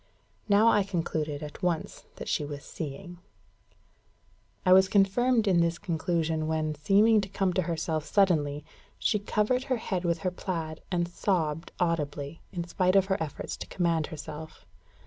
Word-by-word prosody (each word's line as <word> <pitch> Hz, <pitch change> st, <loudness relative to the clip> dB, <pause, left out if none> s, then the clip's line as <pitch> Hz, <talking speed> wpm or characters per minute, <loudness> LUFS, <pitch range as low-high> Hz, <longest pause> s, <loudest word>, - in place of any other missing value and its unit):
Now 205 Hz, +3 st, +5 dB
I 210 Hz, -, +4 dB
concluded 160 Hz, -6 st, -2 dB
at 150 Hz, -1 st, -8 dB
once 175 Hz, -3 st, -2 dB
that -, -, -8 dB
she -, -, 0 dB
was 145 Hz, -1 st, -6 dB
seeing. 170 Hz, +4 st, -7 dB, 1.5 s
I 185 Hz, -, +7 dB
was 190 Hz, 0 st, +6 dB
confirmed 220 Hz, +4 st, +3 dB
in 180 Hz, -3 st, +4 dB
this 170 Hz, 0 st, +1 dB
conclusion 160 Hz, -2 st, -1 dB
when, 155 Hz, -1 st, 0 dB
seeming 205 Hz, +8 st, +4 dB
to 195 Hz, -, -6 dB
come 190 Hz, -1 st, 0 dB
to 185 Hz, -, +2 dB
herself 160 Hz, -2 st, -2 dB
suddenly, 150 Hz, -7 st, +2 dB, 0.3 s
she 210 Hz, -, +1 dB
covered 215 Hz, +5 st, 0 dB
her 255 Hz, -3 st, 0 dB
head 190 Hz, -5 st, -3 dB
with 170 Hz, -1 st, +1 dB
her 185 Hz, -, +2 dB
plaid, 165 Hz, -4 st, -4 dB
and 175 Hz, -1 st, +1 dB
sobbed 170 Hz, -3 st, -1 dB
audibly, 150 Hz, -3 st, -2 dB
in 175 Hz, -2 st, -3 dB
spite 185 Hz, +2 st, +1 dB
of 195 Hz, -1 st, +5 dB
her -, -, 0 dB
efforts 155 Hz, -3 st, -4 dB
to -, -, -7 dB
command 170 Hz, -4 st, 0 dB
herself. 155 Hz, 0 st, -9 dB
170 Hz, 160 wpm, -28 LUFS, 155-195 Hz, 1.5 s, I